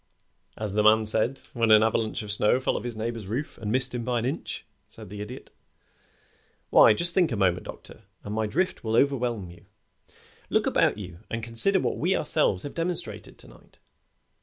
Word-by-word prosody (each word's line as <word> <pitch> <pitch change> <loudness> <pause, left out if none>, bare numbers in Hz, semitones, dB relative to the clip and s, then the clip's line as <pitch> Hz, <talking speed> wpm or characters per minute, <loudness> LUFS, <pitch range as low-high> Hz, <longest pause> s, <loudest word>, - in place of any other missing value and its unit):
"As 105 -2 -4
the 105 - +2
man 110 +1 +5
said 110 +5 +2
when 115 -2 +1
an 110 0 +7
avalanche 110 0 0
of 105 - -4
snow 105 +4 +2
fell 130 - -1
off - - -3
his 120 -2 -5
neighbor's 110 -2 -4
roof 125 +9 -4
and 105 -2 -3
missed 130 +1 +1
him 120 -1 -3
by 125 0 -1
an 115 - -1
inch," 140 +6 -4 0.2
said 110 -4 -12
the 105 0 -7
Idiot. 105 - -9 1.2
"Why, 105 - +7
just 170 +8 -1
think 180 -6 +2
a - - -1
moment, 90 -3 +1
Doctor, - - -11 0.2
and 105 - -6
my 110 0 0
drift 180 - -1
will 110 -1 -1
overwhelm 120 -8 +1
you. 90 0 -17 0.8
Look - - +1
about - - +2
you 90 -4 -9
and 115 -1 -4
consider 115 - +2
what - - -2
we 180 +4 +1
have - - 0
ourselves 145 - 0
demonstrated 165 +4 -4
to - - -16
night. - - -19
115 Hz, 195 wpm, -26 LUFS, 105-130 Hz, 1.2 s, an